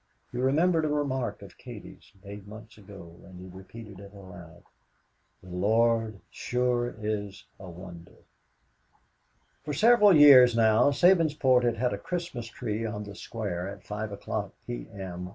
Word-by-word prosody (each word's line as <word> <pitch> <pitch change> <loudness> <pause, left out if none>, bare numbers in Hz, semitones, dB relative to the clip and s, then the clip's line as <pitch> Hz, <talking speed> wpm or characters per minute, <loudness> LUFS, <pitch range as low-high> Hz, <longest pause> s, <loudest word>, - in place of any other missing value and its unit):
He 125 - -5
remembered 160 +6 +2
a - - 0
remark 130 -8 -2
of 100 - -15
Katie's, 120 -5 -12
made 100 0 -10
months 110 +1 -12
ago, 95 -5 -14
and 95 -1 -13
he 90 - -10
repeated 100 +1 -12
it 100 0 -12
aloud, 90 -3 -13 0.8
"The 90 - -14
Lord 110 +2 +1
sure 125 -1 -1
is 105 -2 -5
a 95 -2 -10
wonder!" 85 -1 -13 1.4
For 150 0 -5
several 210 - +5
years 130 -5 +8
now 110 +3 +4
Sabinsport 150 -6 +3
had 120 -1 0
had 125 +2 0
a - - -5
Christmas 170 -10 -5
tree 115 -2 -5
on 105 -2 -4
the 100 -1 -10
square 95 -2 -5
at 100 -2 -11
five 105 0 -6 0.5
P. - - -7
M. 90 -2 -7
110 Hz, 145 wpm, -27 LUFS, 95-125 Hz, 1.4 s, years